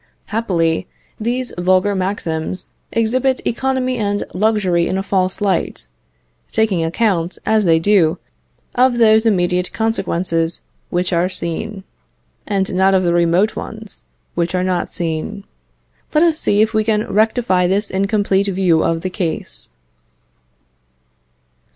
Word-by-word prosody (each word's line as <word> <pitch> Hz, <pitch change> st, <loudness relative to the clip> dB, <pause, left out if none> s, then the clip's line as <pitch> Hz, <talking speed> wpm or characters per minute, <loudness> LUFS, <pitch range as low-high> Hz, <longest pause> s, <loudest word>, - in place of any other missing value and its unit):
Happily, 170 Hz, -7 st, 0 dB, 0.3 s
these 245 Hz, +3 st, -2 dB
vulgar 185 Hz, +3 st, +2 dB
maxims 185 Hz, -3 st, -3 dB, 0.2 s
exhibit 255 Hz, +4 st, +1 dB
economy 255 Hz, 0 st, -1 dB
and 205 Hz, -1 st, -1 dB
luxury 190 Hz, -4 st, +1 dB
in 190 Hz, -, -1 dB
a 195 Hz, -, -2 dB
false 190 Hz, -1 st, 0 dB
light, 190 Hz, -, -1 dB, 0.6 s
taking 215 Hz, -7 st, +1 dB
account, 175 Hz, 0 st, 0 dB
as 220 Hz, -2 st, +2 dB
they 165 Hz, -2 st, +5 dB
do, 170 Hz, -2 st, +3 dB, 0.6 s
of 250 Hz, -1 st, +3 dB
those 220 Hz, -1 st, +5 dB
immediate 180 Hz, -3 st, +1 dB
consequences 180 Hz, -6 st, -1 dB, 0.3 s
which 180 Hz, +1 st, -1 dB
are 175 Hz, +2 st, +2 dB
seen, 190 Hz, +3 st, -4 dB, 0.6 s
and 195 Hz, -2 st, -1 dB
not 190 Hz, +1 st, +3 dB
of 185 Hz, -, +2 dB
the 170 Hz, -1 st, +2 dB
remote 175 Hz, +5 st, +2 dB
ones, 220 Hz, -2 st, -8 dB, 0.3 s
which 170 Hz, +1 st, -1 dB
are 180 Hz, -, +1 dB
not 185 Hz, -1 st, -1 dB
seen. 170 Hz, +4 st, -4 dB, 0.7 s
Let 305 Hz, -, +5 dB
us 330 Hz, -2 st, +2 dB
see 205 Hz, +1 st, +3 dB
if 220 Hz, +1 st, -1 dB
we 215 Hz, 0 st, +2 dB
can 215 Hz, -1 st, +1 dB
rectify 215 Hz, -4 st, +2 dB
this 200 Hz, +3 st, 0 dB
incomplete 200 Hz, 0 st, +1 dB
view 180 Hz, -4 st, +2 dB
of 165 Hz, 0 st, 0 dB
the 185 Hz, -, -2 dB
case. 175 Hz, -4 st, -4 dB
195 Hz, 130 wpm, -18 LUFS, 175-220 Hz, 0.7 s, they